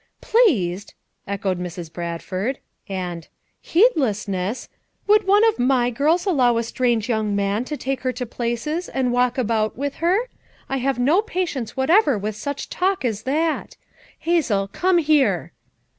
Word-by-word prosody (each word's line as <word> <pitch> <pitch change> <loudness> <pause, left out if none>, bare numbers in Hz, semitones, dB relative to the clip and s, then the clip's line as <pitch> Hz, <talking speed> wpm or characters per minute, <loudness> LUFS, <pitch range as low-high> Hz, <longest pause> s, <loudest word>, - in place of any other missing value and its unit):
"'Pleased!'" 205 - +1 0.3
echoed 195 -2 -2
Mrs. 175 -2 -6
Bradford; 185 +8 -3 0.3
and 180 -3 -4
u - - -31 0.3
'Heedlessness!' 220 - +1 0.4
Would 420 -1 +4
one 410 +2 +5
of 445 - 0
my 245 -1 +2
girls 310 +8 +1
al 385 - +2
low 245 -5 +3
a 230 - +1
strange 235 -1 0
young 215 -3 0
man 200 +4 0
to 300 +2 -4
take 270 -1 -3
her 255 - 0
to 250 0 -4
places, 240 +9 -3
and 260 -2 0
walk 245 +1 +2
about 220 -3 0
with 280 +1 -3
her? 375 +9 +1 0.4
I 270 - -1
have 270 +1 0
no 290 +11 +3
patience 345 - -3
whatever 285 - +4
with 205 +1 -3
such 285 +7 -5
talk 370 -4 -1
as 215 -4 -1
that. 315 +3 -1 0.4
Hazel, 255 - +1
come 360 - +1
here!" 305 -4 +2
250 Hz, 155 wpm, -22 LUFS, 210-320 Hz, 0.4 s, one